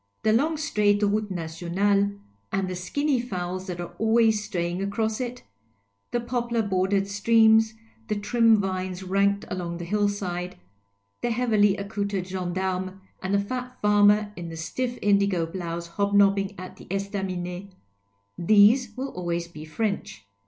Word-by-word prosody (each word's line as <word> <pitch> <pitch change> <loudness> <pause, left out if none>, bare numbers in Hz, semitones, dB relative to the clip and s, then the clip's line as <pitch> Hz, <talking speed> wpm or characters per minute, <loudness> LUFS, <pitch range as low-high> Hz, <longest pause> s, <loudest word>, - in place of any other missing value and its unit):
The 215 - +3
long 305 +7 +2
straight 210 -8 +2
route 210 +1 +1
nationale 185 +4 0 0.4
and 195 -1 0
the 185 - -4
skinny 265 +9 0
fowls 185 -4 -4
that 175 -2 -5
are 175 0 -6
always 220 -1 +3
stray 175 -4 -2
ing 180 +2 -3
across 220 +3 -1
it, 250 0 -5 0.7
the 240 - 0
poplar 235 -1 -1
bordered 195 0 +1
streams, 220 +1 +4 0.3
the 210 - -1
trim 225 +2 +4
vines 185 -1 -3
ranked 200 +2 +1
along 175 -2 -4
the 175 - -6
hill 205 +3 +1
side, 180 -2 -4 0.6
the 240 - 0
heavily 215 -4 +3
accoutred 200 -2 -3
gendarme 185 +1 -3 0.2
and 190 +1 0
the - - +3
fat 250 +4 -5
farmer 210 0 +4
in 170 -1 -6
the 165 - -7
stiff 245 +10 -3
indigo 200 -4 +3
blouse 170 0 -5
hobnobbing 200 +2 +2
at 185 0 -9
the - - -13
esiaminet, 190 -1 -4 0.7
these 215 +5 +5
will 270 +2 -3
always 170 -3 -3
be 155 -2 -10
French. 155 - -3
200 Hz, 145 wpm, -25 LUFS, 180-220 Hz, 0.7 s, these